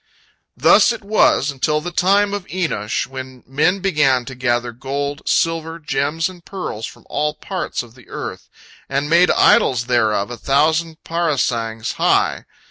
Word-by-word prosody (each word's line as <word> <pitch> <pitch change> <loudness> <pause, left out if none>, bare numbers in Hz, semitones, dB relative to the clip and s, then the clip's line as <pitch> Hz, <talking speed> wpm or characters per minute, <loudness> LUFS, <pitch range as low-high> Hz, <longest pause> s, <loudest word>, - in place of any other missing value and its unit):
Thus - - +5
it 230 -3 -6
was 200 -8 +3
until 150 +3 0
the 175 +3 -6
time 200 +3 +2
of 205 -3 -4
Enosh, 155 - -2
when 130 -1 -9
men 155 +9 +1
began 150 -9 +2
to 135 - -7
gather 120 -1 -1
gold, 140 +4 -4
silver, 165 0 0
gems, 150 +2 -1
and 180 -2 -12
pearls 140 - -5
from - - -14
all 150 0 -1
parts 185 -7 -4
of 115 -2 -16
the 125 0 -19
earth, - - -7 0.4
and 140 +2 -1
made 175 +2 +5
idols 120 -3 +4
thereof 110 -3 +1
a 120 - -6
thousand 160 +5 +1
parasangs 125 -9 -1
high. - - +2
145 Hz, 150 wpm, -19 LUFS, 125-170 Hz, 0.4 s, Thus